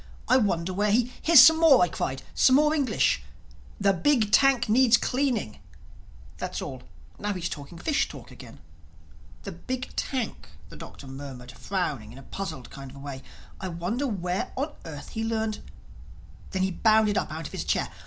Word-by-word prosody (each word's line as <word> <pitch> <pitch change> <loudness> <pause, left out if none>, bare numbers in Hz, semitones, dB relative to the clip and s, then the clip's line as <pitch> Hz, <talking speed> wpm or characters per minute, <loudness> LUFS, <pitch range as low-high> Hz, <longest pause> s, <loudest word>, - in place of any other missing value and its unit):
I 255 - +5
wonder 185 -6 0
where 205 +3 +1
he—" 240 +4 +2
"Here's 330 -3 +8
some 320 0 +8
more," 295 - +6
I - - +3
cried—"some 160 - +1
more 300 +2 +4
English.... 285 -4 +1 0.6
'The 200 -1 +3
big 220 - +2
tank 265 0 +4
needs 240 +1 +5
cleaning'.... 250 - -1 0.8
That's - - -4
all. - - -6 0.4
Now 205 0 -2
he's 180 -2 -3
talking 145 +3 -8
fish 290 - 0
talk - - -11
again." - - -12 0.9
"The - - -6
big 255 -1 -6
tank!" 260 -4 -3 0.2
the - - -12
Doctor - - -11
murmured 135 -2 -9
frowning 145 - -3
in 125 - -12
a 135 - -11
puzzled 135 -7 -7
kind 135 -1 -9
of 135 - -13
way. 140 -1 -7 0.4
"I 190 - -4
wonder 185 +11 -2
where 180 -5 -2
on 290 +3 -2
earth 150 -3 -8
he 225 - -4
learned—" 220 -1 -2 0.9
Then 190 0 -1
he 190 - 0
bounded 215 +2 +3
up - - -1
out 160 +1 -6
of - - -7
his - - -4
chair. - - 0
205 Hz, 175 wpm, -26 LUFS, 165-255 Hz, 0.9 s, Here's